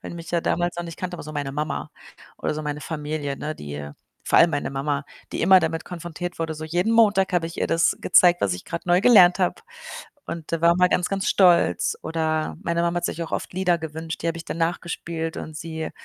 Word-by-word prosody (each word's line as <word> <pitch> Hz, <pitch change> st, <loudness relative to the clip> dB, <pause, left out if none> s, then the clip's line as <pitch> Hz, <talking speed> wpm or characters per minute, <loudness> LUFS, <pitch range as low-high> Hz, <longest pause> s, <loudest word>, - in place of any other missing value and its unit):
weil -, -, -7 dB
die 170 Hz, -, -8 dB
mich 170 Hz, +1 st, -9 dB
ja 170 Hz, -, +2 dB
damals 175 Hz, +1 st, -1 dB
noch 175 Hz, -, -3 dB
nicht 165 Hz, -1 st, -8 dB
kannte, 180 Hz, -1 st, -4 dB
aber -, -, -7 dB
so 155 Hz, -, -8 dB
meine 145 Hz, -2 st, -3 dB
Mama 150 Hz, +2 st, -3 dB, 0.5 s
oder -, -, -2 dB
so 155 Hz, -, -4 dB
meine 150 Hz, 0 st, -4 dB
Familie, 150 Hz, -2 st, -4 dB
ne, 155 Hz, +1 st, -4 dB
die 75 Hz, -, -7 dB, 0.4 s
vor -, -, +4 dB
allem 170 Hz, -, +6 dB
meine 145 Hz, -2 st, -2 dB
Mama, 140 Hz, +1 st, -2 dB, 0.3 s
die -, -, -2 dB
immer 185 Hz, +1 st, +7 dB
damit 165 Hz, 0 st, -2 dB
konfrontiert 175 Hz, 0 st, -6 dB
wurde. 160 Hz, -1 st, -2 dB
So 155 Hz, +1 st, -7 dB
jeden 175 Hz, +7 st, 0 dB
Montag 210 Hz, -5 st, +4 dB
habe 175 Hz, -2 st, +1 dB
ich 165 Hz, -, -9 dB
ihr -, -, +1 dB
das 165 Hz, 0 st, +2 dB
gezeigt, 175 Hz, -1 st, +5 dB
was 100 Hz, -, +1 dB
ich 90 Hz, -, -9 dB
grad 170 Hz, -, -5 dB
neu 175 Hz, +1 st, +4 dB
gelernt 195 Hz, -6 st, +7 dB
habe. 180 Hz, -2 st, 0 dB, 0.6 s
Und 165 Hz, -2 st, -6 dB
da 165 Hz, -, 0 dB
war 170 Hz, 0 st, +6 dB
man 180 Hz, 0 st, +4 dB
ganz, 180 Hz, 0 st, +1 dB
ganz 195 Hz, -1 st, -1 dB
stolz. 175 Hz, -, +3 dB
Oder 160 Hz, -1 st, -1 dB
meine 170 Hz, -3 st, 0 dB
Mama 170 Hz, 0 st, 0 dB
hat 175 Hz, -, -5 dB
sich 170 Hz, -, -2 dB
auch 165 Hz, -, -7 dB
oft -, -, -3 dB
Lieder 180 Hz, -1 st, +1 dB
gewünscht, 160 Hz, 0 st, -6 dB
die 170 Hz, -, -2 dB
habe 165 Hz, 0 st, -2 dB
ich 165 Hz, -, -8 dB
dann -, -, -4 dB
nachgespielt 165 Hz, -1 st, -3 dB
und 155 Hz, -, -7 dB
sie 160 Hz, 0 st, -5 dB
165 Hz, 240 wpm, -24 LUFS, 155-175 Hz, 0.6 s, immer